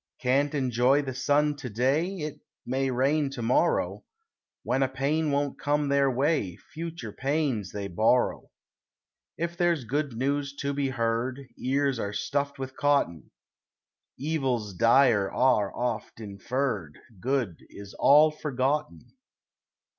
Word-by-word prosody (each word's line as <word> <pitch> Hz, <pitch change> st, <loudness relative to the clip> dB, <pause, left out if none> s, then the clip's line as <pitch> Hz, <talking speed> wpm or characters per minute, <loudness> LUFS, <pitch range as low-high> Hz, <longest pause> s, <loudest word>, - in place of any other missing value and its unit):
Can't 140 Hz, +3 st, +1 dB
enjoy 130 Hz, +1 st, +2 dB
the 130 Hz, -2 st, -4 dB
sun 145 Hz, +3 st, +2 dB
to 130 Hz, -, -6 dB
day 140 Hz, -, 0 dB
It 150 Hz, -1 st, -5 dB, 0.3 s
may 135 Hz, +2 st, 0 dB
rain 140 Hz, +3 st, +1 dB
to 120 Hz, -4 st, -5 dB
morrow; 120 Hz, +3 st, +1 dB, 0.6 s
When 130 Hz, +3 st, 0 dB
a 135 Hz, -, +3 dB
pain 145 Hz, +4 st, 0 dB
won't 140 Hz, 0 st, -1 dB
come 145 Hz, 0 st, 0 dB
their 140 Hz, -1 st, +3 dB
way, 130 Hz, -, 0 dB, 0.2 s
Future 160 Hz, -8 st, -6 dB
pains 135 Hz, -, -1 dB
they 100 Hz, -1 st, -4 dB
borrow. 110 Hz, +7 st, +1 dB, 0.9 s
If 170 Hz, +1 st, -3 dB
there's 175 Hz, -5 st, +1 dB
good 140 Hz, +3 st, -2 dB
news 140 Hz, +2 st, -1 dB
to 140 Hz, 0 st, -2 dB
be 140 Hz, -1 st, -1 dB
heard, 120 Hz, +2 st, -1 dB
Ears 135 Hz, -1 st, 0 dB
are 100 Hz, -1 st, -3 dB
stuffed 140 Hz, +7 st, -2 dB
with 130 Hz, 0 st, -6 dB
cotton; 140 Hz, -, +1 dB, 0.9 s
Evils 130 Hz, -8 st, -1 dB
dire 115 Hz, 0 st, +4 dB
are 115 Hz, -6 st, +2 dB
oft 120 Hz, -2 st, -3 dB
inferred; 105 Hz, -, -3 dB, 0.2 s
Good 120 Hz, -, -1 dB
is 100 Hz, -1 st, -11 dB
all 150 Hz, +2 st, +6 dB
forgotten. 150 Hz, 0 st, -2 dB
135 Hz, 130 wpm, -27 LUFS, 120-145 Hz, 0.9 s, all